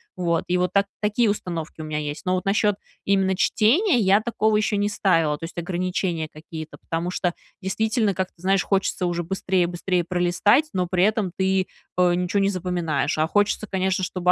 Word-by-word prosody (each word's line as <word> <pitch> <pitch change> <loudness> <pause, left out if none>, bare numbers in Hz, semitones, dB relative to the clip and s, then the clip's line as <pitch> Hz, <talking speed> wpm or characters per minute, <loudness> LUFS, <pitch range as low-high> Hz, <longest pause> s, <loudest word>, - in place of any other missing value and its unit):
Вот. 170 -2 0
И 180 - +1
вот 180 0 0
так, 200 0 +3
такие 210 +2 +2
установки 170 -6 -4
у - - -5
меня 155 -1 -3
есть. 150 0 -5
Но 185 - +1
вот 185 - -3
насчет 205 +1 +2 0.3
именно 190 -1 +2
чтения, 250 - +3
я 200 -1 +4
такого 220 -2 +1
еще 210 0 +1
не 205 +1 +1
ставила. 165 -7 +2
То - - -14
есть, 165 - -11
ограничения 175 -1 -2
какие-то, 155 0 -9
потому 165 +2 -3
что, 180 -1 -1 0.3
действительно, 215 +2 0
как 185 0 -1
ты - - -47
знаешь, 190 0 +2
хочется 195 -2 0
уже 175 0 -1
быстрее 185 0 0
быстрее 175 0 -1
пролистать, 180 - +2
но 180 -2 0
при 180 +1 +1
этом 210 -3 +1
ты, 190 0 +1 0.3
э, 180 -1 +4
ничё 180 +3 0
не 195 0 +3
запоминаешь. 175 -6 -1
А 155 - +2
хочется, 205 +3 +1
конечно, 190 0 0
чтобы 180 0 +1
185 Hz, 195 wpm, -23 LUFS, 175-200 Hz, 0.3 s, я